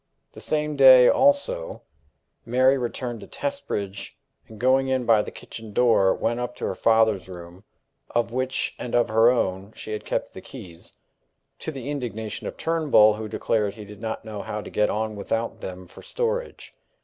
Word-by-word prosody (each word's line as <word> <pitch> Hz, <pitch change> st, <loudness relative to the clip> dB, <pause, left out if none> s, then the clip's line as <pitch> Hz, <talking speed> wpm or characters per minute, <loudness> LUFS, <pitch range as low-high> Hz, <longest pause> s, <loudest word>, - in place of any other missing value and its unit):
The -, -, -12 dB
same 150 Hz, -1 st, -1 dB
day, 130 Hz, -2 st, +8 dB
also, -, -, +1 dB, 0.6 s
Mary 130 Hz, +3 st, +3 dB
returned 120 Hz, -2 st, -4 dB
to -, -, -11 dB
Testbridge, 105 Hz, -, -5 dB, 0.3 s
and, 110 Hz, -, -13 dB
going 130 Hz, +2 st, +3 dB
in 130 Hz, -2 st, 0 dB
by 115 Hz, -2 st, +5 dB
the -, -, -6 dB
kitchen 110 Hz, -2 st, -11 dB
door, 110 Hz, -5 st, +4 dB
went 120 Hz, +1 st, -1 dB
up 125 Hz, 0 st, -4 dB
to -, -, -5 dB
her -, -, -1 dB
father's 110 Hz, -5 st, +2 dB
room, 90 Hz, +2 st, -11 dB, 0.4 s
of 120 Hz, -1 st, 0 dB
which 130 Hz, +1 st, -2 dB
and 125 Hz, -, -4 dB
of 120 Hz, -, +3 dB
her 115 Hz, +2 st, +5 dB
own 100 Hz, -4 st, -1 dB
she -, -, -8 dB
had 105 Hz, -, -4 dB
kept -, -, -3 dB
the -, -, -9 dB
keys 85 Hz, -2 st, -12 dB, 0.7 s
to -, -, -5 dB
the 135 Hz, -1 st, -6 dB
indignation 110 Hz, -6 st, -5 dB
of -, -, -7 dB
Turnbull, 155 Hz, -10 st, +4 dB
who 110 Hz, +1 st, -6 dB
declared 105 Hz, -1 st, -1 dB
he 105 Hz, -2 st, -9 dB
did 105 Hz, 0 st, -12 dB
not 110 Hz, 0 st, -4 dB
know 105 Hz, -2 st, -6 dB
how 105 Hz, -, -5 dB
to -, -, -10 dB
get 105 Hz, 0 st, +1 dB
on 110 Hz, 0 st, -2 dB
without 115 Hz, +3 st, -3 dB
them 90 Hz, 0 st, -7 dB
for 85 Hz, -, -14 dB
storage. 485 Hz, 0 st, -3 dB
115 Hz, 180 wpm, -24 LUFS, 105-130 Hz, 0.7 s, day